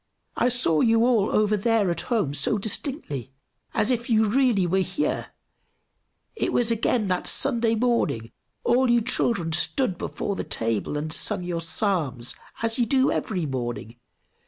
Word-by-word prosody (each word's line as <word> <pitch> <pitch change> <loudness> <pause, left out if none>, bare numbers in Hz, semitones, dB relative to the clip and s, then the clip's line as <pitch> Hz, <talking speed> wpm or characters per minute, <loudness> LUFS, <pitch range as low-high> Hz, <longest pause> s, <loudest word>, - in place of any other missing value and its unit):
"I 245 - +2
saw 230 -11 +2
you 230 0 +4
all 230 -5 +2
over 210 0 +2
there 210 -2 +1
at 170 - -1
home 210 - 0
so 145 +9 0
distinctly, 200 - -3 0.5
as 215 - +2
if 240 -1 -1
you 220 -1 +4
really 235 -4 +2
were 185 +2 +1
here; 190 +9 -1 1.1
it - - -1
was 235 -1 +1
again 230 -1 +1
that 180 -1 -1
Sunday 235 -4 +2
morning; 225 - 0 0.3
all 250 +1 +3
you 235 0 +4
children 205 -7 -1
stood 190 +3 +1
before 200 - -3
the - - -3
table 115 +5 -2
and 155 +1 -1
sung 205 -4 +1
your 175 -1 -3
Psalms, 165 - -1 0.3
as 225 +2 0
you 240 - +2
do 265 +2 +3
every 185 -6 -2
morning. 120 -4 -5
210 Hz, 155 wpm, -25 LUFS, 165-235 Hz, 1.1 s, you